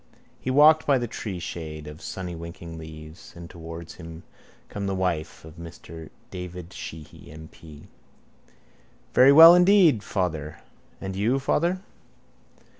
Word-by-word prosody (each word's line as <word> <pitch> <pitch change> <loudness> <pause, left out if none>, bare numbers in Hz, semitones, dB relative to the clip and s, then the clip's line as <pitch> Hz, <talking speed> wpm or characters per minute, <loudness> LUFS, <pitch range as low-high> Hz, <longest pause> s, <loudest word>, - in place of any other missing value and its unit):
_ - - -27 0.2
He - - -5
walked 150 +4 +5
by 140 -2 +4
the 120 -1 -3
treeshade 85 -8 -6
of 75 +1 -10
sunnywinking 85 -2 -7
leaves: 80 +1 -11
and 85 0 -10
towards 85 -1 -10
him 80 +1 -10 0.4
came 100 -1 -5
the 95 - -2
wife 90 -5 -3
of 80 +1 -13
Mr 85 -1 -11 0.2
David 90 -1 -8
Sheehy 80 -2 -10
M.P. 80 0 -13 1.3
—Very 130 +2 +7
well, 165 +4 +10
indeed, 180 - +5
father. 80 -7 -3 0.4
And 95 -1 -6
you, 110 +7 +1
father? 170 +7 0
85 Hz, 125 wpm, -25 LUFS, 80-120 Hz, 1.3 s, well